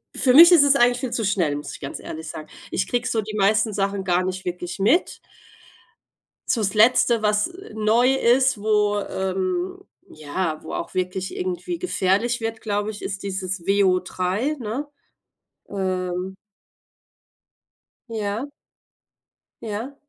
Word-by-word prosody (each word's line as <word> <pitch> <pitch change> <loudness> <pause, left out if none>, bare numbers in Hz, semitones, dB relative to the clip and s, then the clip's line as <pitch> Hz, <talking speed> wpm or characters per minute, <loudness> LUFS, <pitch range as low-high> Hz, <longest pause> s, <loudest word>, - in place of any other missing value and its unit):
für 255 -2 +3
mich 335 +5 +10
ist 335 -5 +8
es 285 0 +5
eigentlich 245 -1 +3
viel 250 -2 -4
zu 235 -1 -1
schnell, 175 -7 +1
muss 145 - -6
ich - - -9
ganz 140 - -6
ehrlich 160 0 -7
sagen. 155 -1 -8 0.2
Ich 190 - -1
kriege 245 +1 -1
so 225 -3 0
die 215 +1 -7
meisten 215 +2 +2
Sachen 195 -1 -1
gar 180 -1 +1
nicht 185 0 -4
wirklich 180 +1 -5
mit. 245 - +2 1.3
So 230 - +1
das 195 - 0
letzte, 230 +1 +4
was, 210 0 +2
äh, 360 - -13
neu 225 +4 +3
ist, 260 -2 +3
wo, 210 -1 +2
ähm 185 -1 -2 0.3
ja, 155 +1 -4
wo - - -9
auch - - -5
wirklich 185 - -3
irgendwie 365 -2 -4
gefährlich 240 - 0
wird, 225 0 -4
glaube 205 -1 -2
ich, 210 - -10
ist 195 0 -5
dieses 190 -2 -4
WO3, 195 +6 +1
ne? 245 +6 -4 0.8
Ähm. 185 -1 -3 1.7
Ja. 215 +2 -3 1.2
Ja. 225 +6 -5
205 Hz, 145 wpm, -23 LUFS, 185-240 Hz, 1.7 s, mich